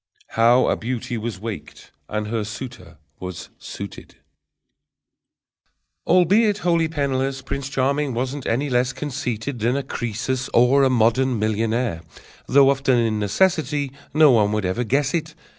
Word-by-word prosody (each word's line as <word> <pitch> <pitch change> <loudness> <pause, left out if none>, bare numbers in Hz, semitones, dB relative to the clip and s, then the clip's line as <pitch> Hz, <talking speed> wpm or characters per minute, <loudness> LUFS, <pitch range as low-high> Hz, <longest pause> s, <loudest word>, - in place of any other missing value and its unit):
_ - - -13
How 120 +3 +5
a - - +2
Beauty 125 +1 -4
was 110 -3 -4
Waked 110 0 -8 0.2
and 105 0 -2
Her 115 -1 -1
Suitor 110 -7 -8 0.2
was 90 -1 -7
Suited - - -9 1.9
Albeit 200 +5 +4
wholly 170 -2 +3
penniless, 135 -3 -2
Prince 140 0 -4
Charming 140 0 0
wasn't 130 +3 -3
any 130 +6 0
less 125 0 +1
Conceited 135 -3 -4
than 120 +5 +1
a 140 - -2
Croesus 125 +1 -3
or 125 +4 +5
a 135 - +4
modern 125 +1 +2
millionaire: 110 -2 -1 0.5
Though 135 +1 +6
often 135 -2 +1
in 110 -2 +1
necessity, 145 - +1 0.2
No 155 -1 +6
one 105 -4 +3
would 105 -2 -1
ever 95 +7 -1
guess 135 +4 0
it. 165 -1 -2
130 Hz, 140 wpm, -22 LUFS, 115-140 Hz, 1.9 s, Though